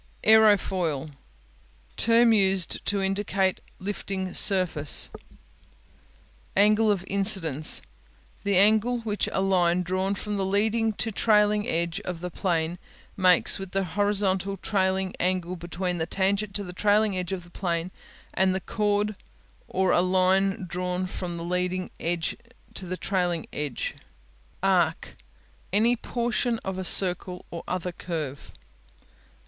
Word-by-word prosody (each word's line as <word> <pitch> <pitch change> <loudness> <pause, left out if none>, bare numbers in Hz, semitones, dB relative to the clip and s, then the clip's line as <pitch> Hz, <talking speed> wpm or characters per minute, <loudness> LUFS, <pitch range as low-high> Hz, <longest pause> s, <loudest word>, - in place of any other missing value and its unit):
Aerofoil 190 -9 +3 0.8
Term 230 0 +4
used 190 -3 +2
to 200 -1 +1
indicate 195 -1 0 0.2
lifting 190 -1 -4
surface, 180 -7 +2 1.5
Angle 215 +2 +4
of 195 -3 -1
Incidence 190 -7 +3 0.6
The 200 -2 +2
angle 220 +5 +3
which 210 -2 -2
a 190 - 0
line 180 -2 +2
drawn 185 +2 -1
from 210 +1 -4
the 195 - -1
leading 220 +3 +1
to 225 +2 -2
the - - -17
trailing 210 0 +3
edge 170 -3 -1
of 180 -4 -6
the 180 0 -5
plane 170 -1 -1 0.4
makes 185 0 +4
with 195 -1 -8
the 195 0 +1
horizontal 195 +1 0
trailing 190 -1 0
angle 180 0 -1
between 175 +1 -4
the 160 - -2
tangent 195 +2 0
to 205 - -1
the 180 -2 -8
trailing 210 +1 +2
edge 180 -1 -3
of 185 -2 -4
the 175 - -17
plane 170 -1 -2 0.4
and 190 0 +2
the - - 0
chord 210 +2 -1 0.5
or 190 0 +1
a - - +4
line 185 +1 +2
drawn 180 +1 -3
from 180 -2 -5
the 170 - -5
leading 180 +1 -2
to 195 +5 -5
the 185 +1 -4
trailing 180 -4 -1
edge. 145 -4 -3 0.7
Arc 175 -4 +1 0.6
Any 230 +4 +3
portion 240 0 -1
of 190 -1 -3
a - - -3
circle 180 0 +1
or 170 - -6
other 180 0 -3
curve. 155 -6 -6
190 Hz, 130 wpm, -26 LUFS, 180-205 Hz, 1.5 s, Term